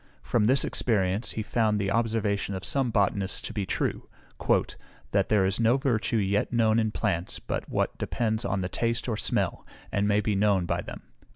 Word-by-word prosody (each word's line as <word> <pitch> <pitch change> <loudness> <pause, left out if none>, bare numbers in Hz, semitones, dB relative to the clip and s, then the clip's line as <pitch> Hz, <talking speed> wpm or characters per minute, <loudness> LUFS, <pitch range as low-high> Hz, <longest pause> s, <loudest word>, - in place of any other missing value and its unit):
From 115 -3 +1
this 130 +5 +4
experience 100 -2 0
he 110 - -3
found 110 -1 +1
the 100 -1 -1
observation 105 -3 0
of 95 +1 -5
some 135 -3 +1
botanists 100 -2 +1
to - - -6
be 100 -3 -3
true, - - -2 1.0
"That - - +1
there 105 -3 +3
is 95 +3 -1
no 115 +3 +4
virtue 120 -4 0
yet 100 0 0
known 115 -2 +3
in 110 -1 +1
plants 95 -5 -2
but - - -5
what - - -1
depends 110 -1 -1
on 95 -5 -1
the 90 - -1
taste 115 +6 -2
or 115 - 0
smell, - - 0 0.3
and 100 0 +1
may 105 0 +3
be 105 0 0
known 100 -2 +2
by - - -1
them." - - -9
105 Hz, 190 wpm, -27 LUFS, 100-115 Hz, 1.0 s, this